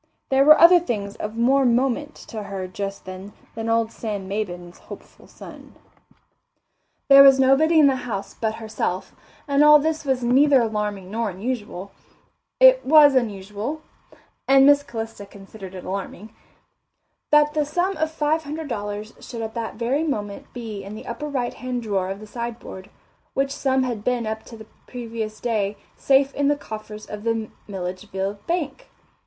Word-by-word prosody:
There 270 0 +4
were 305 +2 +7
other 350 +1 +8
things 210 -11 -4
of 215 +2 -6
more 265 +4 +3
moment 260 +4 +1
to 220 - -8
her 195 -2 -5
just 195 +1 -6
then 185 +2 -9 0.2
than 225 0 -4
old 225 0 +1
Sam 205 -4 -5
Maybin's 180 -4 -5
hopeful - - -13
son. - - -13 1.3
There 275 0 +9
was 270 -1 +7
nobody 275 +5 +4
in 300 - +7
the 270 -2 +3
house 220 -6 -5
but 220 -1 -2
herself, 215 -4 -4 0.3
and 280 0 +3
although 300 -1 +7
this 320 0 -1
was 265 -3 -1
neither 270 +3 +5
alarming 210 -4 -3
nor 225 0 -1
unusual, 200 -1 -5 0.7
it - - +7
was 295 0 +7
unusual 215 +4 -2 0.6
and 270 0 +6
Miss 285 0 +6
Calista 225 -5 -7
considered 195 -1 -12
it 185 - -8
alarming 195 +2 -6 1.0
that 295 0 +4
the 305 - +1
sum 350 +6 -1
of 315 0 0
five 315 0 0
hundred 305 +1 -6
dollars 210 -2 -5
should 230 -2 -7
at 220 0 -5
that 230 -2 -5
very 245 +6 -1
moment 210 -10 -4
be 220 -5 -7
in 200 +2 -8
the - - -10
upper 235 +6 -5
right 250 -4 -2
hand 250 -1 -5
drawer 195 -4 -1
of 195 +1 -5
the 215 - -10
sideboard, 235 -4 -7 0.5
which 275 0 0
sum 265 -1 0
had 235 -5 -3
been 245 -1 0
up 220 0 -4
to 230 - -11
the 220 - -11 0.2
previous 225 -3 -6
day 210 -4 -1 0.2
safe 275 0 +2
in 285 0 0
the 290 - +3
coffers 215 -5 -9
of 210 0 -8
the 225 -1 -2 0.2
Millageville 195 +1 -4
bank. 335 -4 -3
230 Hz, 165 wpm, -23 LUFS, 205-275 Hz, 1.3 s, There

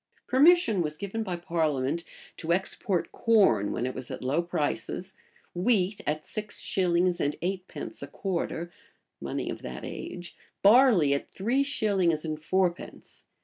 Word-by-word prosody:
[] - - -35
Permission 275 - +5
was 150 -2 -3
given 200 +5 -4
by 190 -5 -2
parliament 160 -3 -1 0.3
to 165 - -3
export 185 0 0
corn 190 - +3
when 120 - -2
it 130 - -2
was 125 - -6
at - - -6
low 140 +6 +1
prices; 175 +3 -2 0.4
wheat 195 +1 +1
at 155 +1 -1
six 210 -1 -4
shillings 180 -1 +1
and 145 - 0
eightpence 185 0 -4
a 140 - -5
quarter, 175 0 -3 0.5
money - - -3
of - - -5
that 65 0 -7
age; 175 -1 -7 0.3
barley 205 - +6
at 140 - -3
three 235 +8 0
shillings 195 - +1
and 155 -1 -4
fourpence. 185 +1 -2
180 Hz, 145 wpm, -28 LUFS, 155-200 Hz, 0.5 s, barley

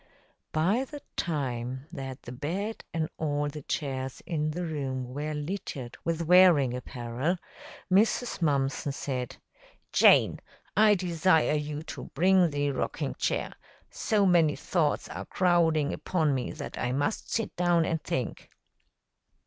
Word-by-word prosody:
By 190 +11 +2
the 290 +2 -9
time 130 -4 -2
that 135 -1 -7
the 120 - -8
bed 180 - -4
and 160 -1 -1
all 145 -1 0
the 150 +1 -7
chairs 135 -2 -3
in 155 -3 -1
the 175 +4 -3
room 130 -5 -3
were 150 +2 -3
littered 150 -6 -5
with 165 0 -1
wearing 170 -7 +6
apparel, 125 +6 -2 0.5
Mrs. 220 +3 +2
Mumpson 140 -2 0
said, 130 -3 -4 0.6
"Jane, - - +6 0.4
I 210 0 +6
desire 175 -3 +2
you 150 0 -2
to - - -7
bring 180 +2 +5
the 145 -1 0
rocking 130 - -2
chair. - - -1 0.4
So 210 -2 +1
many 170 -5 +4
thoughts 160 -5 0
are - - -6
crowding 165 -5 +2
upon 160 -5 0
me 130 -2 -2
that - - -7
I 125 - -1
must 145 +10 -1
sit 225 -2 -2
down 175 -2 +3
and 160 -1 -1
think." 130 -5 -3
155 Hz, 135 wpm, -28 LUFS, 135-175 Hz, 0.6 s, wearing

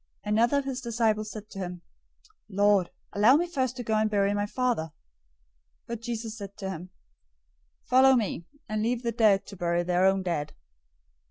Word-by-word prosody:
008:021 210 - -2
Another 235 +6 +3
of 280 - -1
his 265 -1 -3
disciples 220 -3 0
said 215 -1 -8
to 195 - -8
him, 180 -2 -5 0.7
"Lord, 200 -2 +3 0.2
allow 215 +6 +6
me 340 +4 +2
first 260 -8 -2
to 245 - -4
go 220 - -2
and 215 0 +2
bury 200 -1 +2
my 205 0 -1
father." 250 -4 0
008:022 160 - -14 0.9
But 235 -1 -6
Jesus 230 -2 -4
said 200 -1 -8
to 195 -2 -4
him, 180 0 -7 0.9
"Follow 265 +1 +5
me, 200 -7 -2 0.2
and 215 0 -2
leave 240 +2 -1
the 235 - 0
dead 215 -4 +3
to 200 - -10
bury 175 0 0
their 180 +1 +2
own 190 0 +2
dead." 150 -5 -2
215 Hz, 185 wpm, -27 LUFS, 195-235 Hz, 0.9 s, allow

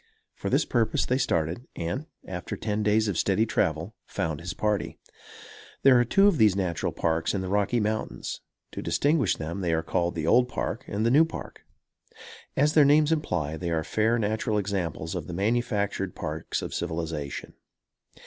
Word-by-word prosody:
For - - -4
this - - +2
purpose 115 -2 +1
they 130 +1 +1
started, 85 - -1
and, 85 - -3 0.2
after 90 -2 -5
ten 105 -1 -2
days 105 +1 +3
of 100 -5 -1
steady 105 +3 +2
travel, 80 -1 -1
found 80 -2 -2
his 85 +1 -5
party. 105 -1 -1 0.9
There 130 -2 +7
are - - +5
two 195 - +4
of 200 -8 +4
these 105 -4 +5
natural 90 -4 -1
Parks 80 +2 0
in 95 - -1
the 95 - -4
Rocky 105 +5 +1
Mountains. 110 0 -3 0.3
To - - -5
distinguish 145 - +2
them 85 +5 -5
they 85 -2 0
are 80 0 0
called 85 0 -1
the 80 -2 -2
Old 125 +8 +4
Park - - -3
and 105 +2 -1
the 115 - +3
New 150 +5 +7
Park. 160 - -7 0.9
As 145 +3 +3
their 155 - +7
names 150 +2 +5
imply, 80 - -1
they 85 +1 -3
are 80 -1 0
fair 110 +5 +1
natural 110 0 0
examples 90 -5 -2
of 85 -5 -4
the 90 - -6
manufactured 100 -2 -1
parks 80 -1 -4
of - - -5
civilization. 80 -4 -4
100 Hz, 175 wpm, -27 LUFS, 85-120 Hz, 0.9 s, There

